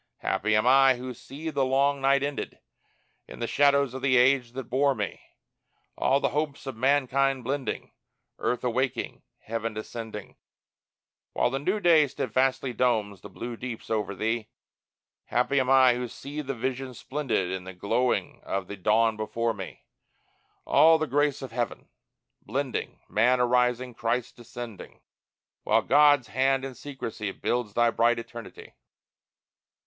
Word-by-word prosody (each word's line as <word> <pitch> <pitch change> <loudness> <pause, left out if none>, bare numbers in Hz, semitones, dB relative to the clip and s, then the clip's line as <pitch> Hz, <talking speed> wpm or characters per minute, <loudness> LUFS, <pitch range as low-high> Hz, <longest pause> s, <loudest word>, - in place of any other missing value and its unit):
Happy 110 0 +1
am 110 - +2
I 135 +1 +6
who 125 +1 -6
see 150 +7 -7
the 140 -2 0
long 135 +1 +2
night 140 +1 +3
ended. 145 0 -4 0.7
In - - -10
the 120 - -2
shadows 140 0 +3
of 130 - -6
the 130 -1 +3
age 125 -1 +3
that 135 +1 -5
bore 135 +3 +1
me, - - -4 0.7
All 135 - +2
the - - +1
hopes 150 -1 -3
of 135 -3 -5
mankind 135 +1 +2
blending, 135 +2 -3 0.5
Earth 125 - -1
awaking, 125 0 -2 0.2
heaven 115 0 -4
descending, 110 -1 -7 1.0
While - - +1
the 135 - -1
new 190 +9 0
day 165 -6 +5
steadfastly 130 0 0
Domes 110 -5 0
the 105 - -10
blue 120 +5 -6
deeps 120 -1 -7
over 105 -2 -1
thee! 110 +2 -1 0.8
Happy 125 +3 +1
am 130 -1 0
I 130 -2 +6
who 125 0 -3
see 145 +5 -7
the 135 -2 -4
Vision 130 +1 -4
splendid 125 -10 -2
In 95 -1 -4
the 95 - -7
glowing 120 +7 -1
of 95 -1 -3
the 100 - -7
dawn 110 +4 +2
before 115 +2 -1
me, 95 -3 -9 0.8
All 160 +1 +6
the 155 - -1
grace 145 0 0
of 130 - -7
heaven 120 0 -4 0.5
blending, 130 +3 -4
Man 125 +4 +3
arising, 125 0 +1
Christ 115 +2 -2
descending, 120 -3 -9 0.6
While - - +2
God's 145 -3 +5
hand 135 0 +1
in 135 - -6
secrecy 115 -6 -6
Builds 120 0 -2
thy 120 0 +4
bright 115 +1 +2
eternity. 115 -1 -9
125 Hz, 150 wpm, -27 LUFS, 115-135 Hz, 1.0 s, I